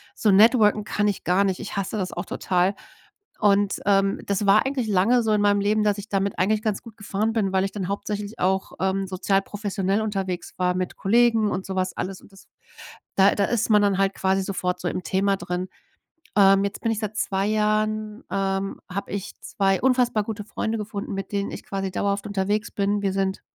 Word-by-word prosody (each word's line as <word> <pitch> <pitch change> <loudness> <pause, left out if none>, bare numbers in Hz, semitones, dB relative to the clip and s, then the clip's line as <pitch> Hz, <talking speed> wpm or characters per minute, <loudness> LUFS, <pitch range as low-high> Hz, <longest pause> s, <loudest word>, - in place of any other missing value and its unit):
so 210 - +2
networken 210 0 +5
kann 210 0 0
ich 200 - -4
gar 185 +3 +3
nicht. 190 -2 -1
Ich - - -6
hasse 195 +2 -2
das 185 -3 -3
auch - - -4
total. 185 +2 0 0.6
Und, 205 -1 +2
ähm, 195 -1 +2
das 200 0 -1
war 205 +4 +5
eigentlich 265 -4 -1
lange 215 +5 +3
so 220 - +1
in 210 - +2
meinem 205 0 +3
Leben, 210 +1 +2
dass 210 -1 +2
ich 205 +1 -7
damit 195 0 -1
eigentlich 210 +3 +2
ganz 215 -2 -1
gut 225 -3 -13
gefahren 205 +2 -1
bin, 205 -4 0
weil 190 0 +2
ich 195 - -4
dann 190 -4 -4
hauptsächlich 205 +1 -4
auch, 190 +1 0
ähm, 190 +1 0
sozial 195 +1 +1
professionell 200 0 -2
unterwegs 195 -4 -3
war 180 0 +1
mit 185 -1 -3
Kollegen 225 0 +3
und 185 - -3
sowas 185 -1 -2
alles 190 0 -4
und - - -18
das 195 - -17 0.7
da 195 +1 +5
da 200 - +2
ist 230 -2 0
man 210 -1 +5
dann 200 -2 +2
halt 195 0 +2
quasi 190 0 +1
sofort 180 -2 -2
so 175 - -2
im 185 - -4
Thema 195 +4 +1
drin. 180 +1 -4 0.7
Ähm, 195 0 +6
jetzt 200 - -5
bin 230 - 0
ich 220 - -2
seit 215 -1 -4
2 195 -2 0
Jahren 215 0 0
ähm, 195 0 -1
habe 200 +2 -4
ich 200 -1 -4
2 195 -1 0
unfassbar 245 -4 +2
gute 210 -1 -5
Freunde 220 +1 -3
gefunden, 205 -1 -5
mit 195 0 -5
denen 200 0 -1
ich - - -7
quasi 195 -1 -3
dauerhaft 200 +2 -1
unterwegs 205 +2 -1
bin. 205 0 0
Wir 195 -1 0
sind 195 0 -1
200 Hz, 210 wpm, -24 LUFS, 195-210 Hz, 0.7 s, Ähm